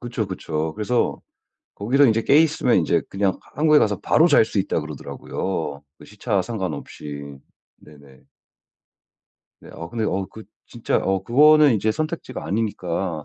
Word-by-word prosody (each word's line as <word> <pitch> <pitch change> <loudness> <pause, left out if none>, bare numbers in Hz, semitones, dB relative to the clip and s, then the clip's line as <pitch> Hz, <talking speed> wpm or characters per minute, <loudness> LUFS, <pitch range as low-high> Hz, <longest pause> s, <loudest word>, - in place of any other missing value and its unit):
그쵸, 115 -3 -4
그쵸. 80 -4 -4
그래서 115 +3 -1 0.5
거기서 130 +8 +2
인제 115 -1 +2
깨 140 - +4
있으면 155 -6 +2
인제 80 - +1
그냥 95 -1 0
하 - - -13
한국에 155 -1 +5
가서 105 -7 +1
바로 - - +3
잘 - - +5
수 - - -4
있다 - - 0
그러더라고요. 80 -6 -5 0.2
그 - - -14
시차 105 -1 -2
상관없이. 75 - -6 0.4
네네. 70 -3 -18 1.4
네. - - -14
어. 85 +1 -8
근데 115 +1 -3
어 95 -2 -2
그 110 - -12 0.2
진짜 120 -2 -2
어 95 0 -1
그거는 150 +5 +5
인제 110 +1 0
선택지가 155 - -5
아니니까 90 -4 -3
100 Hz, 315 characters per minute, -22 LUFS, 85-120 Hz, 1.4 s, 한국에